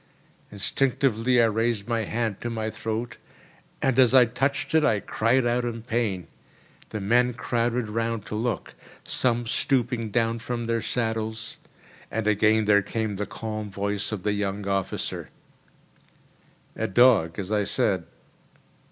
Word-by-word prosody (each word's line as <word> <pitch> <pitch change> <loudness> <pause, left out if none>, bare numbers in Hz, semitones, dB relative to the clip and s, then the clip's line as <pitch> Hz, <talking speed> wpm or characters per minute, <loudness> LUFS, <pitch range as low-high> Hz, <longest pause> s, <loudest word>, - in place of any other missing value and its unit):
Instinctively 125 +2 +1
I 115 - +6
raised 115 -1 0
my 115 -2 0
hand 110 -2 -2
to 120 - -3
my 110 -1 -3
throat, 115 +2 -4 0.7
and 135 -1 +2
as 130 0 +6
I 125 -2 +8
touched 135 +3 -1
it 160 -1 +4
I 110 -8 +3
cried 120 +5 +1
out 120 +1 +1
in 115 -2 -4
pain. 110 -7 -1 0.6
The 105 - -4
men 120 +4 +2
crowded 120 -1 -1
round 115 0 -2
to - - -7
look, 110 -3 -2 0.3
some 120 -1 0
stooping 120 -2 0
down 115 +1 0
from 120 0 -4
their 115 0 0
saddles; 110 -2 -2 0.5
and 110 -1 -2
again 110 +1 +3
there 100 -1 +5
came 105 0 -3
the 105 - -3
calm 110 -2 -5
voice 100 +1 -2
of 105 -4 -4
the 105 - +1
young 100 0 -2
officer: 95 -1 -2 1.5
"A - - -1
dog, 100 -7 +4
as 100 0 -4
I 105 -1 +2
said. - - 0
115 Hz, 145 wpm, -25 LUFS, 105-120 Hz, 1.5 s, I